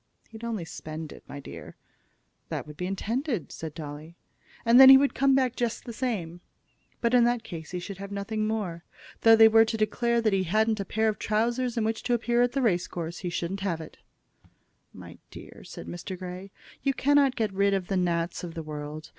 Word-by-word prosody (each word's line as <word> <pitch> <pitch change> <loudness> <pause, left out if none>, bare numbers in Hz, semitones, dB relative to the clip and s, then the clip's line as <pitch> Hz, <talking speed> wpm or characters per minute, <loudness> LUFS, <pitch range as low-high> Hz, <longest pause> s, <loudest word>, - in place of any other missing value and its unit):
"He'd 225 0 -12
only 220 -7 -3
spend 155 0 -7
it, - - -14
my 145 - -8
dear." 80 - -10 0.7
"That - - -4
would 150 -1 -11
be 180 +4 -4
intended," 225 - -2
said 160 -2 -7
Dolly. 155 +2 -8 0.5
"And 235 +2 +6
then 265 - +11
he 270 - +11
would 280 +1 +2
come 270 0 +3
back 255 -2 +1
just 240 -2 -2
the 235 - -6
same." 190 -9 -3 0.6
"But 235 0 +1
in 245 -1 +6
that 240 -1 +1
case 160 -3 -8
he 180 - -4
should 190 +2 -7
have 200 0 -7
nothing 215 +2 -2
more. 190 -7 -3 0.4
Though 225 0 +7
they 225 0 +8
were 225 0 +6
to 225 0 -2
declare 235 +2 +1
that 220 -3 +1
he 190 -1 +1
hadn't 215 +4 +1
a 200 - -3
pair 220 +2 0
of 215 - -1
trousers 235 +3 0
in 225 - +1
which 225 0 -1
to 245 - +1
appear 240 +1 +1
at 245 +2 +1
a 270 - +1
race 180 -6 +1
course, 170 0 -6
he 180 - -4
shouldn't 175 +3 -3
have 190 -4 -2
it." 160 - -11 0.9
"My - - -12
dear," - - -12
said - - -9
Mr. 85 - -6
Grey, 185 +1 -7 0.3
"you 275 -1 0
cannot 280 0 +3
get 215 -4 -1
rid 200 +1 +2
of 190 -2 -2
the 195 - -1
gnats 170 -2 -1
of 170 -1 -7
the 165 - -5
world. 150 0 -7
200 Hz, 215 wpm, -27 LUFS, 170-235 Hz, 0.9 s, then